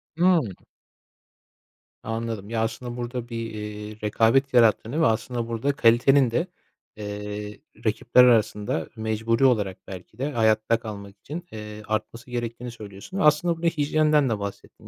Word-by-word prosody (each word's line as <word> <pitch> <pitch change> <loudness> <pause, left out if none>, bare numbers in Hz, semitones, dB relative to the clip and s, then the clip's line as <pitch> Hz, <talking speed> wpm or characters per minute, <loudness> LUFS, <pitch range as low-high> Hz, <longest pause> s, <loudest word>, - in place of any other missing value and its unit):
Hıı. 180 +1 +4 1.6
Anladım. 115 -2 -4
Ya, 115 -1 -1
aslında 120 +2 -3
burada 120 0 -5
bir, 115 -1 -4
eee, 105 0 -7
rekabet 115 +6 +2
yarattığını 120 +4 +3
ve - - +5
aslında 115 +1 0
burada 115 +5 -1
kalitenin 125 0 +4
de, 165 +9 0 0.5
eee, 105 0 -6 0.3
rakipler 115 +3 +4
arasında 105 -8 +2
mecburi 110 +2 0
olarak 105 -7 +2
belki 95 -2 -10
de 140 +4 -2
hayatta 110 -1 +2
kalmak 100 -3 -8
için, 165 - -7
eee, 105 0 -8
artması 110 +4 -4
gerektiğini 120 0 -4
söylüyorsun. 105 - -9
Aslında 160 +1 +3
buraya 170 0 +2
hijyenden 150 -2 +2
de 110 -3 -1
bahsettin. 100 -1 -8
115 Hz, 135 wpm, -25 LUFS, 105-130 Hz, 1.6 s, ve